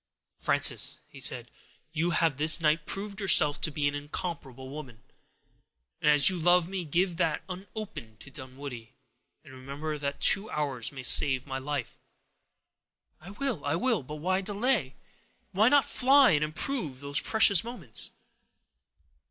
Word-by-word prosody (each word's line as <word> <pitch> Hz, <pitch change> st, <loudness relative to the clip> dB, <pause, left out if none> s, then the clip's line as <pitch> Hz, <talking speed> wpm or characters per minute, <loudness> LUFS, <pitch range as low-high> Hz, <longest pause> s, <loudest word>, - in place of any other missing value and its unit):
"Frances," -, -, 0 dB
he -, -, -14 dB
said, -, -, -2 dB, 0.4 s
"you 165 Hz, +2 st, -1 dB
have 165 Hz, -4 st, +1 dB
this 155 Hz, +3 st, +5 dB
night 155 Hz, -1 st, 0 dB
proved 200 Hz, +1 st, -3 dB
yourself 150 Hz, -6 st, +4 dB
to -, -, +1 dB
be 145 Hz, -1 st, -2 dB
an 145 Hz, -, -2 dB
incomparable 145 Hz, -3 st, -7 dB
woman. 130 Hz, -5 st, -10 dB, 1.0 s
As 150 Hz, -2 st, +5 dB
you 185 Hz, -2 st, +3 dB
love 175 Hz, +1 st, +3 dB
me, 185 Hz, -2 st, -5 dB
give 175 Hz, +3 st, -1 dB
that 165 Hz, -4 st, -1 dB
unopened 185 Hz, -, -9 dB
to 140 Hz, -, -11 dB
Dunwoodie, 130 Hz, -3 st, -10 dB, 0.5 s
and -, -, -15 dB
remember 140 Hz, +4 st, -6 dB
that 140 Hz, -1 st, -4 dB
two 200 Hz, +3 st, +2 dB
hours 140 Hz, -6 st, -3 dB
may 135 Hz, -2 st, -9 dB
save 130 Hz, +1 st, +5 dB
my 135 Hz, -2 st, -5 dB
life." 135 Hz, -2 st, -5 dB, 1.2 s
"I 175 Hz, -, -13 dB
will—I 205 Hz, -, -3 dB
will; 225 Hz, +2 st, 0 dB
but 150 Hz, +3 st, -9 dB
why 185 Hz, +5 st, -1 dB
delay? 205 Hz, -, -1 dB, 0.6 s
Why 215 Hz, +5 st, +3 dB
not 285 Hz, 0 st, +4 dB
fly, 270 Hz, +1 st, +4 dB
and 150 Hz, -2 st, +1 dB
improve 155 Hz, -, -2 dB
these 140 Hz, 0 st, 0 dB
precious 205 Hz, -5 st, +4 dB
moments?" 195 Hz, -, -5 dB
155 Hz, 145 wpm, -28 LUFS, 140-190 Hz, 1.2 s, this